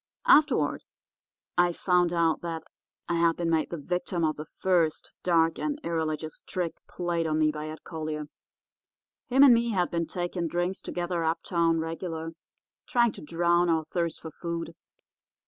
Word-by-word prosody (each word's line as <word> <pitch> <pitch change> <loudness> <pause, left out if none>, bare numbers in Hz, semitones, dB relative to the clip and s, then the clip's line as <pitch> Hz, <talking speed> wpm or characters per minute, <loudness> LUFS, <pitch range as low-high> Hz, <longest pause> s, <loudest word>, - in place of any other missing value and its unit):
Afterward 310 - +4 0.8
I 175 0 +5
found 180 -1 +2
out 165 -2 +2
that 165 -2 -4 0.4
I 170 - 0
had 165 0 +3
been 170 -1 0
made 160 -1 +1
the 170 - -4
victim 175 +3 -2
of 155 -1 +1
the 150 - -7
first 170 -4 0
dark 165 -2 +2
and 300 -1 -2
irreligious 155 -2 -2
trick 175 -3 -2 0.2
played 170 -2 -1
on 155 0 0
me 155 -1 +3
by 150 0 -5
Ed 155 - -9
Collier. 155 -2 -4 1.0
Him 265 +2 +5
and 270 -3 +9
me 235 0 +2
had 180 -3 +1
been 170 -1 -1
taking 175 -1 -2
drinks 175 +3 -1
together 175 -1 -2
uptown 165 0 +1
regular, 165 0 -4 0.6
trying 235 -2 +3
to - - -11
drown 170 +2 +2
our 160 -1 +2
thirst 170 0 -2
for 160 - -8
food. 170 +1 -5
170 Hz, 160 wpm, -28 LUFS, 160-175 Hz, 1.0 s, and